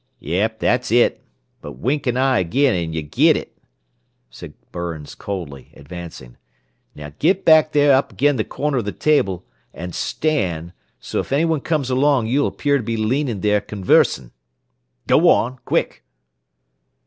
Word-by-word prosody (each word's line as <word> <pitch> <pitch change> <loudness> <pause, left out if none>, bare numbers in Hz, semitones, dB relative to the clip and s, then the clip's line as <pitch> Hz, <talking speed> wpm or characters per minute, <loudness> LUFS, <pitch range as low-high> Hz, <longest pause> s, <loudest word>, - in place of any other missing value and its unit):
"Yep, 100 +8 -2
that's 125 +1 0
it. 120 +1 +3 0.4
But - - -8
wink 140 +4 -2
an 125 0 0
eye 130 -1 +2
agin, 130 +10 +1
an' 85 -2 -2
y' 80 0 -3
git 75 - +3
it!" - - -8 0.8
said - - -11 0.2
Burns 85 -4 -6
coldly, 80 -10 -7
advancing. 75 -5 -10 0.6
"Now, 75 -1 -9
git 185 +5 +1
back 155 -3 +5
there 145 -1 +4
up 135 +1 +1
agin 145 0 +2
the 110 - 0
corner 140 +2 -2
of 115 - -4
the 105 - -4
table, 100 - 0 0.3
an' 90 +1 -6
stand, 90 - -2 0.3
so - - -4
'f - - -5
anyone 160 +1 +1
comes 145 -5 -1
along 135 -2 +2
you'll 135 +6 +1
appear 145 -1 0
to 125 - -5
be 115 +1 -3
leanin' 115 -1 -1
there, 105 -1 +2
conversin'. 90 - +1 0.7
Go - - +4
on, 130 +2 +1
quick!" - - -1
115 Hz, 155 wpm, -20 LUFS, 85-140 Hz, 0.8 s, back